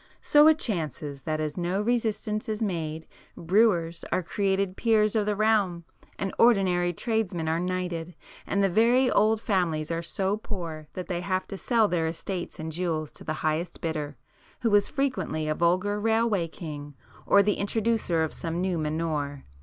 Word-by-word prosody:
So 295 Hz, +1 st, +6 dB
it 315 Hz, -1 st, +6 dB
chances, 155 Hz, -, -3 dB
that 155 Hz, 0 st, -1 dB
as 155 Hz, +1 st, -3 dB
no 180 Hz, +2 st, -1 dB
resistance 220 Hz, 0 st, -1 dB
is 215 Hz, -1 st, -2 dB
made, 160 Hz, -7 st, -3 dB, 0.3 s
brewers 170 Hz, -2 st, +2 dB
are 185 Hz, -, +1 dB
created 195 Hz, +1 st, 0 dB
peers 215 Hz, -1 st, +2 dB
of 210 Hz, -1 st, +1 dB
the 210 Hz, -, +1 dB
realm, 205 Hz, -5 st, +2 dB, 0.3 s
and 195 Hz, -1 st, -3 dB
ordinary 185 Hz, -6 st, +4 dB
tradesmen 185 Hz, -4 st, -1 dB
are 160 Hz, +1 st, +1 dB
knighted, 180 Hz, -2 st, -3 dB, 0.3 s
and 200 Hz, 0 st, +1 dB
the -, -, +5 dB
very 235 Hz, +7 st, +3 dB
old 215 Hz, +1 st, +3 dB
families 170 Hz, -7 st, 0 dB
are 165 Hz, 0 st, -1 dB
so 190 Hz, +4 st, -1 dB
poor 165 Hz, -8 st, -6 dB
that 185 Hz, -, -6 dB
they 175 Hz, -2 st, -2 dB
have 185 Hz, 0 st, -1 dB
to -, -, -5 dB
sell 230 Hz, -3 st, +3 dB
their 165 Hz, -4 st, 0 dB
estates 175 Hz, +2 st, -5 dB
and 160 Hz, 0 st, -5 dB
jewels 160 Hz, -2 st, -2 dB
to -, -, -11 dB
the 155 Hz, -, -2 dB
highest 160 Hz, +2 st, -1 dB
bidder, 150 Hz, -4 st, -3 dB, 0.5 s
who 225 Hz, -3 st, +2 dB
is 205 Hz, -1 st, +5 dB
frequently 260 Hz, -, -1 dB
a 155 Hz, -, +1 dB
vulgar 185 Hz, +6 st, +1 dB
'railway 220 Hz, -4 st, +1 dB
king' 145 Hz, -3 st, -8 dB, 0.3 s
or 200 Hz, -, +6 dB
the 205 Hz, +1 st, +1 dB
introducer 205 Hz, -5 st, +1 dB
of 160 Hz, -, -3 dB
some 165 Hz, 0 st, -4 dB
new 180 Hz, -2 st, 0 dB
manure. 150 Hz, -3 st, -2 dB
180 Hz, 170 wpm, -27 LUFS, 160-210 Hz, 0.5 s, So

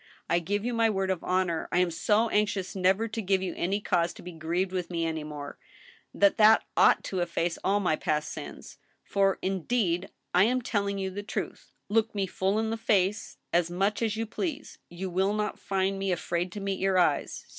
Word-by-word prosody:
I 170 Hz, -, +2 dB
give 205 Hz, +5 st, -2 dB
you 245 Hz, -, -1 dB
my 230 Hz, -1 st, +3 dB
word 195 Hz, -2 st, 0 dB
oi 190 Hz, -, 0 dB
honor, 180 Hz, -3 st, 0 dB
I -, -, +1 dB
am 180 Hz, -1 st, +3 dB
so 210 Hz, +7 st, +2 dB
anxious 205 Hz, -3 st, 0 dB
never 190 Hz, +4 st, +2 dB
to 225 Hz, +1 st, -4 dB
give 190 Hz, -1 st, +1 dB
you 180 Hz, -, -3 dB
any 195 Hz, +4 st, 0 dB
cause 175 Hz, -4 st, 0 dB
to -, -, -13 dB
be 180 Hz, -, -7 dB
grieved 170 Hz, +3 st, -2 dB
with 185 Hz, -2 st, -3 dB
me 170 Hz, -2 st, -1 dB
any 160 Hz, -1 st, -2 dB
more, 145 Hz, -1 st, -8 dB, 0.5 s
that 200 Hz, -1 st, +3 dB
that 220 Hz, +1 st, +6 dB
ought -, -, +5 dB
to 190 Hz, -, -3 dB
efface 170 Hz, 0 st, -1 dB
all 200 Hz, +2 st, +2 dB
my 180 Hz, -6 st, +1 dB
past 150 Hz, -1 st, -1 dB
sins. -, -, -9 dB, 0.2 s
For, 195 Hz, -1 st, +1 dB
indeed, 190 Hz, -1 st, 0 dB, 0.2 s
I 180 Hz, +3 st, +6 dB
am 250 Hz, +2 st, +1 dB
telling 200 Hz, -3 st, -1 dB
you 190 Hz, -1 st, -2 dB
the 200 Hz, +2 st, -5 dB
truth. 205 Hz, -, -5 dB, 0.2 s
Look 225 Hz, +1 st, +1 dB
me 200 Hz, -1 st, +1 dB
full 190 Hz, +2 st, -1 dB
in 220 Hz, 0 st, 0 dB
the 225 Hz, -, -2 dB
face 205 Hz, -2 st, 0 dB, 0.2 s
as 170 Hz, -1 st, +3 dB
much 195 Hz, +5 st, 0 dB
as 220 Hz, -2 st, 0 dB
you 225 Hz, -, -1 dB
please, 300 Hz, -, -5 dB
you 175 Hz, +2 st, -5 dB
will 190 Hz, +3 st, +1 dB
not 210 Hz, 0 st, -2 dB
find 195 Hz, 0 st, -1 dB
me 195 Hz, -1 st, 0 dB
afraid 175 Hz, 0 st, -1 dB
to 210 Hz, -, -5 dB
meet 195 Hz, -1 st, -2 dB
your 190 Hz, -1 st, +2 dB
eyes. 165 Hz, -5 st, +1 dB
190 Hz, 210 wpm, -28 LUFS, 175-210 Hz, 0.5 s, that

